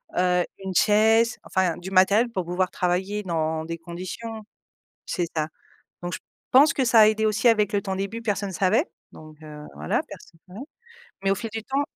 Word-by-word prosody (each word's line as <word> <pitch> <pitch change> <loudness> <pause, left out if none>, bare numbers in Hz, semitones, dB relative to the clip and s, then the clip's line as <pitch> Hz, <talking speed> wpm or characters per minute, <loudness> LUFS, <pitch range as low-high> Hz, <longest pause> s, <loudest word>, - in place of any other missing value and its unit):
heu, 180 0 +2 0.2
une 190 -1 -5
chaise, 220 +4 +4
enfin, 185 -3 0
du 180 +2 -8
matériel 200 +5 +4
pour 185 -7 -3
pouvoir 180 +1 -1
travailler 190 +3 -1
dans 160 -3 -2
des 165 +1 -5
conditions 185 +7 -7 0.7
c'est 175 - 0
ça 155 -1 -1 0.5
donc 175 -1 -5
je - - -4 0.3
pense 280 +3 +7
que 265 - 0
ça 230 -1 +5
a 215 - +8
aidé 220 0 +1
aussi 215 +3 +1
avec 210 -2 +2
le 200 - +1
temps. 195 - -5
Au - - -3
début 200 +4 -4
personne 200 -3 -2
savait, 210 - +2 0.3
donc 155 0 -13
heu, 150 -1 -10
voilà 75 +2 -1
personne 165 - -13
savait 190 +6 -10 0.6
mais 195 - +1
au - - +3
fil 225 +4 -5
du 220 +1 -5
temps 275 +3 0
195 Hz, 195 wpm, -24 LUFS, 175-220 Hz, 0.7 s, a